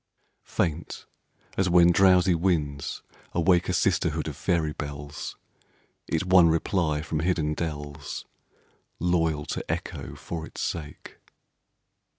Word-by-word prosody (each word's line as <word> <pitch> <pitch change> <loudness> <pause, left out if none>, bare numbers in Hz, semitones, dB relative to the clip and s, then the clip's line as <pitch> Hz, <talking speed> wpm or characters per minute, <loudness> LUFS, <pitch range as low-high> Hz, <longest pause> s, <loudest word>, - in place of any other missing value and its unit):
Faint, 85 0 -2 0.5
as 95 -1 +2
when 85 0 +6
drowsy 90 0 +5
winds 80 -5 -1 0.3
awake 85 +1 +3
A - - +1
sisterhood 80 -4 +1
of 75 - -4
faery 80 +1 0
bells, 70 0 -6 0.7
It 80 +2 0
won 90 -2 +6
reply 80 -2 +1
from 80 0 -2
hidden 80 -2 +1
dells, 75 -3 -5 0.7
Loyal 80 -3 +1
to - - -3
Echo - - -5
for 80 -1 -6
its - - -11
sake. 75 -3 -5
80 Hz, 115 wpm, -26 LUFS, 75-90 Hz, 0.7 s, when